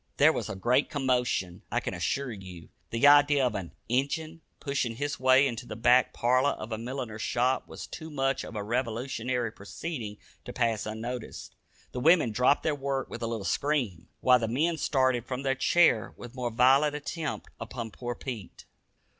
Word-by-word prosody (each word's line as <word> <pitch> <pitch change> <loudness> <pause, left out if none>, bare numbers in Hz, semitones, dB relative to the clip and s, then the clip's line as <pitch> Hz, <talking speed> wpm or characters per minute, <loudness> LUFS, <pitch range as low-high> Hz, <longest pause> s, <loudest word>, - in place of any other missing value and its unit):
There - - +6
was - - -3
a - - -4
great 125 +8 +2
commotion, 125 - 0
I - - +2
can - - -4
assure 120 - -2
you. 95 -6 -10 0.2
The 115 +4 +1
idea 145 -1 +6
of 125 - 0
an 95 -5 -5 0.2
"Injun" 155 +6 -1 0.2
pushing 135 -5 -2
his 145 +4 -3
way 130 +1 +5
into 120 -2 -3
the - - -6
back 120 +3 +4
parlor 130 +4 +2
of 110 +2 -8
a 110 - -2
milliner's 120 -2 -5
shop 125 +3 0
was - - -8
too 160 -1 -8
much 135 -2 0
of - - -9
a 105 - -3
revolutionary 120 +1 -2
proceeding 110 +1 -6 0.3
to - - -7
pass 115 -4 0
unnoticed. 115 +2 -6 0.4
The 125 - -4
women 155 -3 +4
dropped 125 +6 +3
their 155 - +1
work 140 -1 -3
with 120 - -6
a 115 - -1
little 115 -4 -4
scream, 125 - -1
while 125 -1 +5
the 115 - -1
man 160 +8 0
started 130 -5 +1
from 130 +1 -4
his 135 -1 0
chair 160 -9 +3
with 120 -1 -10
most 120 -3 -4
violent 135 +4 +5
intent 150 +2 -4
upon 115 -3 -6
poor 120 +1 -5
Pete. 115 -9 -8
125 Hz, 180 wpm, -28 LUFS, 115-140 Hz, 0.4 s, There